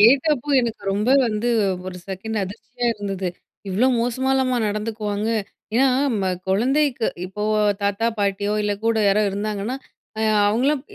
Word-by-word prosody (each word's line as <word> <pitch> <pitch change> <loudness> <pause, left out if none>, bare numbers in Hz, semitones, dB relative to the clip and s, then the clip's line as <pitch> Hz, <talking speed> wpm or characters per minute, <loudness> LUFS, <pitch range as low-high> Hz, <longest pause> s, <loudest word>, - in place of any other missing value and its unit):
கேட்டப்ப 275 +5 +4
எனக்கு 230 -4 -3
ரொம்ப 210 +4 0 0.2
வந்து 220 +1 -1 0.4
ஒரு 185 -1 -6
செகண்ட் 195 +4 -4
அதிர்ச்சியா 225 +5 -5
இருந்தது. 195 -3 -3 0.4
இவ்ளோ 200 +7 +2
மோசமாலாமா 260 +2 +1
நடந்துக்குவாங்க? 210 0 -2 0.5
ஏன்னா, 265 +3 +5 0.3
ம 190 - -1 0.2
குழந்தைக்கு 250 +5 +2 0.2
இப்போ 190 +3 -6 0.4
தாத்தா, 200 +3 +1
பாட்டியோ 200 0 0
இல்ல 205 - 0
கூட 230 0 +2
யாரோ 200 +2 +4
இருந்தாங்கன்னா, 210 +4 -3 0.4
அ - - -1 0.3
அவங்கலாம் 260 +6 +1
220 Hz, 125 wpm, -22 LUFS, 200-245 Hz, 0.5 s, ஏன்னா